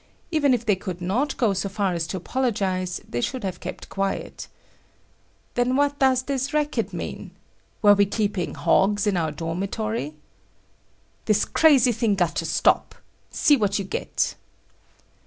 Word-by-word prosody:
Even 295 -4 +3
if 240 -2 +1
they 210 -3 +3
could 185 -1 -6
not 235 +11 -1
go 225 -6 +2
so 195 +1 -2
far 195 -1 -1
as 165 -1 -2
to 190 - -4
apologize 185 -5 -1
they 120 - -3
should 250 - -3
have 190 -2 -4
kept - - -7
quiet. 195 0 -3 1.1
Then 245 +1 +1
what 285 0 +1
does 260 -1 +3
this 270 +1 -2
racket 300 0 0
mean? - - -6 0.5
Were 205 -1 +8
we 200 0 +3
keeping 205 -3 -2
hogs 195 +5 +2
in 205 -2 +1
our 165 -3 0
dormitory? 180 +2 -3 1.1
"This - - +2
crazy 270 -6 +5
thing 225 -2 +1
got 175 -4 0
to - - -1
stop. - - +2 0.3
See 295 - +4
what 205 -4 +1
you 200 - -3
get!" 190 - -2
205 Hz, 155 wpm, -24 LUFS, 185-255 Hz, 1.1 s, Were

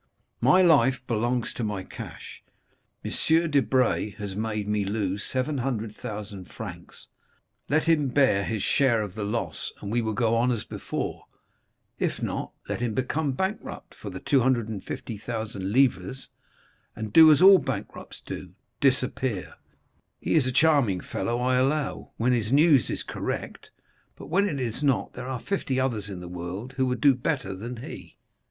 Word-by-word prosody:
My 185 +1 +6
life 140 -6 +5
belongs 120 +1 0
to 120 - -4
my 105 -3 -2
cash. - - -9 0.6
M. - - -3 0.4
Debray 130 -5 +2
has 100 -2 -6
made 105 -1 -2
me 105 -1 +1
lose 100 -1 -2
700,000 110 -7 -3
francs; - - -9 0.6
let 155 +2 +3
him 160 -3 +3
bear 130 -7 +3
his 110 -1 -2
share 120 -6 +3
of 100 -3 -6
the 105 - -4
loss, 110 +3 -3
and 100 - -6
we 120 +1 +2
will 110 -1 -2
go 115 0 +2
on 120 +2 +2
as 115 -4 -2
before; - - -5 0.7
if - - -1
not, - - -3 0.2
let - - -3
him 115 -3 -1
become 140 +2 0
bankrupt 190 +9 -4
for - - -8
the - - -7
250,000 110 -4 -1
livres, 130 -1 +1 0.7
and 110 -1 -6
do 160 -1 +9
as 150 - +5
all 190 +1 +9
bankrupts - - -6
do—disappear. 130 -5 -2 0.7
He - - -1
is 150 -5 +4
a - - 0
charming 135 - +3
fellow, 120 +5 -2
I 125 +1 +2
allow, 140 +3 0
when 125 +2 +2
his 115 -2 0
news 145 - +5
is - - -2
correct; - - -5 0.5
but - - -10
when 200 +5 +2
it 145 -5 -3
is 120 0 -2
not, 140 -4 +1
there 125 0 -7
are 130 -2 -3
fifty 140 -8 -1
others 115 -6 -1
in 95 -3 -6
the 90 - -7
world 90 +8 -6
who 130 -1 +1
would 125 0 -2
do 140 -2 +6
better 125 -5 -2
than 115 +6 -6
he." - - -10
120 Hz, 160 wpm, -26 LUFS, 105-135 Hz, 0.7 s, do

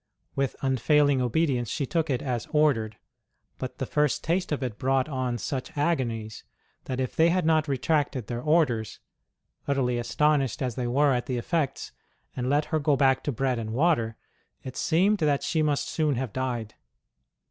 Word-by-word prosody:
With 135 -1 -1
unfailing 135 +1 +3
obedience 125 -2 0
she 140 - -1
took 165 +3 -1
it 130 -3 -1
as 125 -4 -2
ordered; 130 -9 +2 0.6
but - - -5
the - - -2
first 150 -2 0
taste 175 +2 0
of 145 -2 -1
it 115 -5 -4
brought 135 +1 +1
on 130 -4 -2
such 130 +5 -5
agonies 120 -9 -1 0.4
that 130 -1 -3
if 130 -2 -2
they 165 +1 +5
had 180 -1 +1
not 160 -1 +3
retracted 140 -2 0
their 120 +2 -4
orders 145 -8 +1 0.7
utterly 125 -4 +1
astonished 135 +1 +1
as 125 -2 -1
they 120 +1 -3
were 140 +3 +3
at 125 -1 -2
the 125 - -1
effects 150 +3 -2 0.4
and 125 0 -2
let 145 +2 +2
her 155 - +3
go 145 0 +2
back 135 -1 +3
to 145 - 0
bread 130 0 -1
and 110 -1 -4
water, 120 -6 +1 0.5
it 130 - -7
seemed 195 +6 +2
that 145 -3 +1
she 160 - 0
must 150 -2 0
soon 155 -3 0
have 125 -3 -3
died. 120 -4 -3
135 Hz, 175 wpm, -27 LUFS, 125-150 Hz, 0.7 s, they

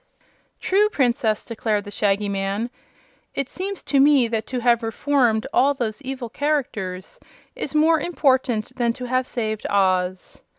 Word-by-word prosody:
"True, 415 +3 +2
Princess," 235 - 0
declared 220 -2 -1
the 205 - -9
Shaggy 205 0 0
Man. 200 +4 -2 0.6
"It 275 -1 -2
seems 390 +1 -5
to 275 0 +1
me 275 -3 +5
that 220 -1 -2
to 255 - -3
have 235 0 +3
reformed 230 -1 +1
all 280 +2 +4
those 230 -2 -3
evil 260 -2 -5
characters 220 -10 -3 0.4
is 305 - -5
more 320 +1 +4
important 260 -8 0
than 235 -2 +1
to 250 +1 -7
have 255 +1 0
saved 220 -3 -3
Oz." 185 -2 0
240 Hz, 145 wpm, -22 LUFS, 215-275 Hz, 0.6 s, me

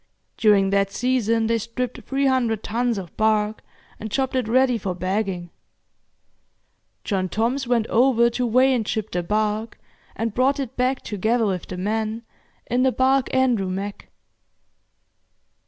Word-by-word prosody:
During 200 -3 +3
that 200 0 +2
season 230 -1 +1
they 230 +1 +1
stripped 235 +2 -4
three 275 +1 -1
hundred 240 -5 +1
tons 235 +1 -1
of 185 -4 -7
bark 215 0 +1 0.4
and 220 - -5
chopped 265 +3 -1
it 255 -4 0
ready 250 0 +3
for 185 -2 -3
bagging. 185 -2 -2 1.5
John 190 -3 -1
Toms 240 +7 -1
went 235 -3 +2
over 235 0 +3
to 245 +1 -1
weigh 255 +3 +4
and 225 -4 -1
ship 220 -1 -2
the 175 - -1
bark, 215 +4 -1 0.4
and 225 -1 -2
brought 270 +4 +2
it 260 -2 -4
back, 255 +1 0
together 220 +3 0
with 185 -4 -2
the 185 - -6
men, 220 +4 -2 0.4
in 245 +1 0
the 260 0 +3
barque 265 +1 +2
'Andrew 245 -7 +2
Mack'. 195 +2 -5
225 Hz, 150 wpm, -23 LUFS, 205-250 Hz, 1.5 s, weigh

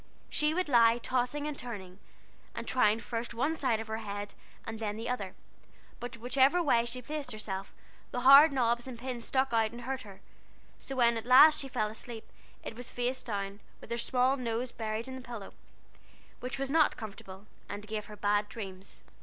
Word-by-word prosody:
She 300 +1 +2
would 365 -1 0
lie 235 -3 +5
tossing, 255 +4 -1
and 300 -1 -3
turning, 200 -8 -7 0.6
and - - -5
trying 220 -3 +3
first 235 0 -4
one 280 +7 +1
side 255 -8 +1
of 225 - -4
her 220 0 -4
head 205 -1 -5 0.3
and 225 0 -6
then 210 -1 -3
the 225 +1 -5
other; 205 -7 -3 0.6
but 245 0 -6
whichever 265 +7 +3
way 235 -6 +3
she 250 +1 -5
placed 290 -1 -4
herself, 200 -3 -5 0.4
the 245 - -3
hard 275 +4 +9
knobs 240 -2 +1
and 250 -2 -7
the - - -15
pins 250 -3 -4
stuck 265 -2 +1
out 225 -1 +3
and 240 +1 -9
hurt 260 +2 -3
her; 200 -5 -12 0.6
so 270 - -6
when 235 -2 +4
at 225 - -5
last 295 +5 +8
she 275 - -2
fell 215 -4 -1
asleep, 225 +1 -8 0.4
it - - -6
was 245 +1 -7
face 245 +1 -2
down, 200 -2 -4 0.2
with - - -13
her 235 - 0
small 255 +3 +2
nose 240 0 -2
buried 220 +1 -3
in 260 - -6
the 260 - -7
pillow, 235 -5 -8 0.9
which 255 +2 -4
was 275 0 -2
not 315 -1 +4
comfortable, 200 -3 -9 0.2
and 205 +1 -6
gave 215 -1 -4
her 210 - -9
bad 205 0 +1
dreams. 195 -4 -8
235 Hz, 195 wpm, -31 LUFS, 215-260 Hz, 0.9 s, hard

